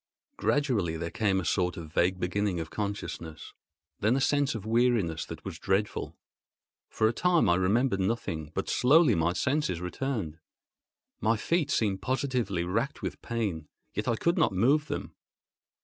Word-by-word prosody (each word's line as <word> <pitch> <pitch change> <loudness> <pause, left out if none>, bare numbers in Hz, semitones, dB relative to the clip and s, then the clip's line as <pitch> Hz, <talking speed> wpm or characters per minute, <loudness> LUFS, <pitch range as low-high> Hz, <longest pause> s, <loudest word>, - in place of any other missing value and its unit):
Gradually 115 - +1
there 85 +1 -4
came 100 -2 +1
a 90 - -4
sort 90 +1 0
of 80 -2 -8
vague 90 +3 +2
beginning 95 0 -1
of 80 -1 -5
consciousness; 100 -6 -5 0.5
then 110 +5 +2
a - - +2
sense 145 -1 +2
of 110 -2 -6
weariness 110 -8 +1
that - - -9
was - - -6
dreadful. 100 +2 -1 0.7
For 110 - +2
a 110 - +1
time 175 - +3
I 85 - +5
remembered 100 +5 +2
nothing; 95 -7 -2
but - - -2
slowly 145 +1 +5
my 85 -1 +1
senses 130 - 0
returned. 90 - -3 0.8
My 115 +1 +2
feet 160 +6 0
seemed 105 -9 +1
positively 125 -8 -1
racked 115 +11 -2
with - - -4
pain, 100 -10 -3 0.3
yet 105 - -3
I 115 - +2
could 170 +9 +1
not - - +3
move 135 +10 +3
them. - - -4
105 Hz, 160 wpm, -29 LUFS, 90-125 Hz, 0.8 s, I